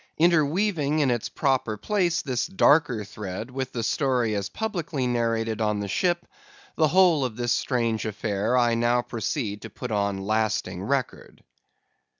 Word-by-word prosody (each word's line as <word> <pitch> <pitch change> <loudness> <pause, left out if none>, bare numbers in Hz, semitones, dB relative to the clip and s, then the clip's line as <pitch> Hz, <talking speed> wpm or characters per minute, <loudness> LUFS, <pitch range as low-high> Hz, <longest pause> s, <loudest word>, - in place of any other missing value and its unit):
Interweaving 160 -1 +2
in 145 -4 +2
its 120 -3 -2
proper 130 -6 0
place 175 - 0
this 130 -2 -1
darker 150 - +3
thread 105 +2 -6
with 130 0 -4
the 115 - -3
story 125 -1 +1
as 100 -1 -2
publicly 170 - -3
narrated 115 -2 0
on 105 -1 +1
the 100 - -3
ship, 175 - 0 0.5
the 155 - +3
whole 170 -3 +4
of 125 -4 -3
this 120 0 -1
strange 115 -4 0
affair 105 +2 -1
I 120 -1 +3
now 120 +1 +2
proceed 110 -2 -3
to 110 - -8
put 125 +3 -7
on 100 -2 0
lasting 105 -4 -1
record. 130 +5 -3
120 Hz, 155 wpm, -25 LUFS, 110-150 Hz, 0.5 s, whole